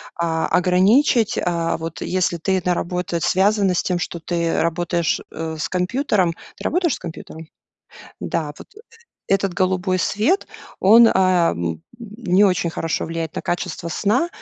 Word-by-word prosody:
а, 165 -1 -1
ограничить. 205 - +3
А, 170 -2 -1
вот 165 0 -7
если 180 -2 0
ты 190 +3 0
на 180 - +1
работу, 175 0 -2
связано 195 +2 +2
с 175 - +1
тем, 180 -1 -1
что 170 - -4
ты 170 -1 -1
работаешь, 170 0 0
э, 160 0 -5
с - - -2
компьютером. 185 -1 0 0.2
Ты - - -11
работаешь 345 -3 +1
с - - -12
компьютером? 160 -1 -9 0.7
Да. 155 -3 -3
Вот - - -12
э - - -12 0.5
этот 195 -1 +1
голубой 185 0 0
свет, 220 - +1 0.3
он, 225 +4 +7
ам, 165 - +1 0.2
не 210 -4 +1
очень 180 -3 +1
хорошо 165 0 -2
влияет 165 -1 -4
на - - -4
качество 175 -1 -3
сна. 215 - +1
180 Hz, 150 wpm, -21 LUFS, 165-195 Hz, 0.7 s, он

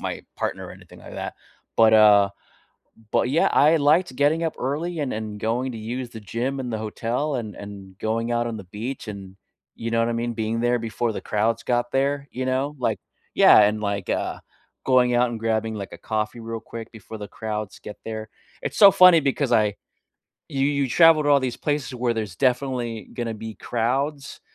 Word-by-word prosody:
my - - -4 0.2
partner - - -3
or - - -9
anything - - -15
like - - -12
that, - - -5 0.4
but, 110 -1 +6
uh, 105 -2 +7 0.8
but, 125 - +2
yeah, 155 - +3
I 155 +3 +5
liked 155 0 +3
getting 150 +4 +2
up 160 - -3
early 155 +6 -3
and 140 -3 -2
and 110 -1 -5
going 120 +4 -1
to - - -6
use 120 +3 -5
the 110 -2 -9
gym 125 +6 -3
in 125 - -5
the 110 - -2
hotel 120 +7 -2
and 110 -4 -4
and 100 -2 -10
going 115 +2 -1
out 120 0 0
on 115 - -4
the 100 - -8
beach 110 +7 -6
and, 95 -2 -9 0.4
you 115 0 -5
know 115 - +2
what 115 - +2
I - - -1
mean? 120 +1 -2
Being 115 0 -2
there 120 0 +2
before 115 +1 -2
the - - -5
crowds 110 +2 0
got 120 0 0
there, 140 +1 0
you 130 +1 -4
know? 135 +3 -1
Like 125 - 0 0.4
yeah, - - +8
and 105 +1 +3
like, 100 -2 -3
uh, - - -2 0.5
going 125 -2 +4
out 120 0 +3
and 115 - -4
grabbing 110 0 -1
like 100 -2 -6
a - - -9
coffee 110 +1 -3
real 115 0 -6
quick 115 0 -8
before 110 0 -9
the 105 -1 -7
crowds 105 -1 -5
get 105 - -9
there. 110 -1 -5 0.3
It's - - -4
so 200 - +10
funny 180 -3 +7
because 140 -1 -1
I 105 -2 +3 0.7
you 135 -1 0
you 140 -2 0
travel 165 +2 +6
to 145 - +1
all 140 -1 +5
these 130 -2 -2
places 145 -4 -2
where 120 -1 0
there's 105 -5 -4
definitely 125 -5 -1
gonna 115 -2 -3
be 110 0 -7
crowds, 135 +5 -2
115 Hz, 205 wpm, -24 LUFS, 110-135 Hz, 0.8 s, so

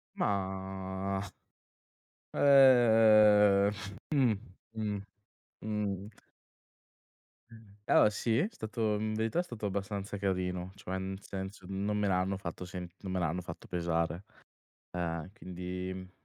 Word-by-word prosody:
Mah, 95 0 -2 2.9
uhm, 125 -8 +3 0.4
mh-mh, 105 -2 -2 0.6
mh. 105 -1 -3 1.3
Mh, 110 -3 -15
allora 105 - +6
sì, 110 +2 0
è 180 - +2
stato 110 - -2
in 110 +1 -2
verità, 110 +9 0
è - - +2
stato 115 -9 -7
abbastanza 100 0 -3
carino, 90 -1 -2
cioè 95 -1 -5
nel 95 +1 -5
senso, 95 -1 -7
non 100 +2 -1
me 105 -1 +1
l'hanno 95 +1 +1
fatto 90 -1 -6
sent 90 -1 -7
non 95 -2 -5
me 95 - 0
l'hanno 85 +1 -1
fatto 85 -1 -9
pesare, 85 0 -1 0.7
uhm, 85 -1 -3
quindi 90 -2 -6
95 Hz, 110 wpm, -31 LUFS, 90-105 Hz, 2.9 s, allora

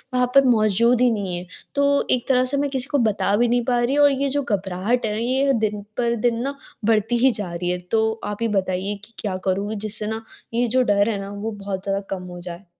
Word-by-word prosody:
वहाँ 250 0 +3
पर 275 0 +7
मौजूद 230 0 +3
ही 250 - +5
नहीं 200 -5 -2
है। 180 +1 -7 0.3
तो 280 0 +2
एक 250 -2 +1
तरह 255 -1 +4
से - - +2
मैं 285 0 0
किसी 265 -1 -2
को 290 - +3
बता 200 -1 +1
भी 240 +2 +3
नहीं 240 +1 +2
पा 245 -2 +2
रही 255 +4 +1
और 290 -1 +6
ये 275 +1 0
जो 285 +1 0
घबराहट 200 +1 -1
है, 215 +2 -2
ये 265 +3 +2
दिन 215 -3 -1 0.2
पर 235 -1 +1
दिन 230 -1 0
ना 280 +1 -3 0.3
बढ़ती 225 +2 +2
ही 265 - +6
जा 205 -6 -3
रही 175 +1 -2
है, 180 - 0
तो 220 +5 0
आप 210 - -3
ही 230 - +2
बताइए 190 +2 -2
कि 230 - -23
क्या 195 -3 -2
करूँ 200 +3 0
जिससे 210 0 -4
ना 220 +1 -4 0.3
ये 240 +1 +2
जो 255 +3 +2
डर 205 -1 +3
है 205 -3 -1
ना, 195 0 -7
वो 205 +2 -4
बहुत 200 -2 -5
ज़्यादा 195 0 -1
कम 190 -2 -4
हो 175 - -8
जाए? 175 +2 -8
220 Hz, 250 wpm, -22 LUFS, 200-250 Hz, 0.3 s, पर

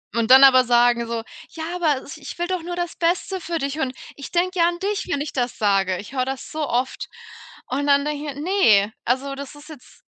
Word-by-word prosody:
Und 230 -1 0
dann 265 +1 +9
aber 255 -1 +8
sagen 240 -1 +3
so: 230 -1 -3 0.3
„Ja, 320 - -8
aber 310 -7 +1
is 310 +3 -10
ich 285 +2 -9
will 345 - -1
doch 370 -1 -2
nur 350 +1 -5
das 350 -1 -4
Beste 360 +2 -1
für 335 0 -3
dich 280 0 -3
und 260 -3 -2 0.2
ich 280 - -9
denke 365 +1 0
ja 335 - +5
an 345 - -2
dich, 405 +2 -2
wenn 285 - -1
ich 295 - -5
das 245 -2 -2
sage.” 195 -3 +1
Ich 205 +8 -10
höre 255 -2 0
das 265 0 -6
so 310 -2 -3
oft. 250 +2 -2 0.6
Und 285 +2 -2
dann 280 0 +4
denke 300 0 -3
ich - - -18
mir: 285 - -7
„Ne, 225 - +3
also 265 +3 -1
das 280 0 -8
ist 290 +2 -14
jetzt“ 295 -5 -14
280 Hz, 240 wpm, -22 LUFS, 250-335 Hz, 0.6 s, dann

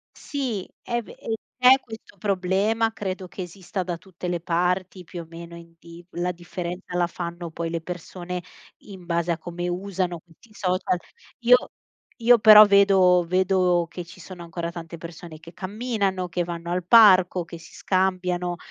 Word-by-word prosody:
Sì, 255 -10 -4
è 240 0 -2
ve 225 - -13
e 225 - -4 0.2
c'è 255 +1 +7
questo 225 -4 -12
problema, 200 +3 +1
credo 190 -3 -5
che 185 - -7
esista 185 +1 -5
da 175 -1 -4
tutte 180 0 -9
le 175 -1 -1
parti, 180 +2 -1
più 175 0 -8
o - - -10
meno, 170 0 -10
in 170 0 -14
di 170 +1 -13
la 180 +1 -2
differenza 180 +1 -6
la 175 -1 +2
fanno 170 0 -6
poi 165 +1 -4
le 165 -1 -3
persone, 180 +1 -6 0.4
in 190 -4 -12
base 170 0 0
a 165 - 0
come 175 +1 -5
usano 180 -2 -2
questi 170 +7 -23
social. 185 -2 0 0.4
Io 245 0 +7 0.7
io 240 +1 +7
però 215 -1 +10
vedo 190 -3 +5
vedo 185 -2 +2
che 170 +1 -7
ci 175 - -14
sono 180 0 -10
ancora 170 0 -5
tante 170 -1 -8
persone 165 -1 -10
che 165 +2 -14
camminano, 195 -1 -2
che 175 +1 -1
vanno 170 0 -6
al 180 0 -2
parco, 185 -4 +6
che 170 - -9
si 165 - -15
scambiano, 180 -2 -1
180 Hz, 170 wpm, -24 LUFS, 170-195 Hz, 0.7 s, però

